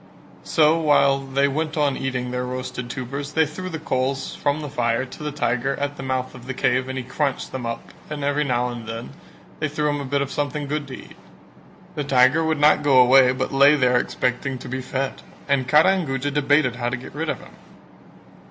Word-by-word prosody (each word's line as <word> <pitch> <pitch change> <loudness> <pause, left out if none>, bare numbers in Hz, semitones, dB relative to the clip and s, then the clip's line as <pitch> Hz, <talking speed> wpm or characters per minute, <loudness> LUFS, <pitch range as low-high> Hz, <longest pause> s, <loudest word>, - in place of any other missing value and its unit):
So 155 +1 +3
while 145 -3 +4
they 135 +1 0
went 155 +3 -2
on 145 -3 +2
eating 125 -2 -3
the 125 0 -2
roasted 125 -1 -5
tubers, 140 +3 -5
they 160 0 +3
threw 185 +5 -6
the 165 - -4
coals 135 -3 -2
from 145 +2 -1
the 150 - -5
fire 120 -3 0
to 130 - -12
the 150 0 -3
tiger 135 -1 -1
at 145 0 -3
the - - -8
mouth 130 -1 -2
of 125 - -12
the 130 - -4
cave 130 +1 +1
and 130 - -4
he 130 - -3
crunched 135 +2 -2
them 125 -3 -4
up 115 0 -6 0.2
and 150 -2 -5
every 145 +1 +1
now 125 -3 0
and 120 -2 -7
then 115 +1 -6 0.5
they 155 - -1
threw 150 0 -1
him 145 -1 -1
a - - -5
bit 140 +1 0
of 140 - -7
something 145 0 -2
good 145 0 -3
to 130 - -7
eat; - - -13 0.8
the 150 - -3
tiger 135 +3 +4
would 160 -1 0
not 150 0 +5
go 140 -3 +5
away 125 0 +6
but 130 +1 -3
lay 140 +2 +6
there 125 -3 +3
expecting 125 +2 -2
to - - -10
be 130 +1 -4
fed, 130 +1 -3 0.3
and 140 -3 +1
Kara 155 +6 +5
and 185 -5 -1
Guja 135 +1 -2
debated 145 -3 +2
how 120 -1 -1
to 125 - -3
get 125 - -11
rid 155 +2 -3
of - - -2
him. - - -15
135 Hz, 225 wpm, -22 LUFS, 125-150 Hz, 0.8 s, away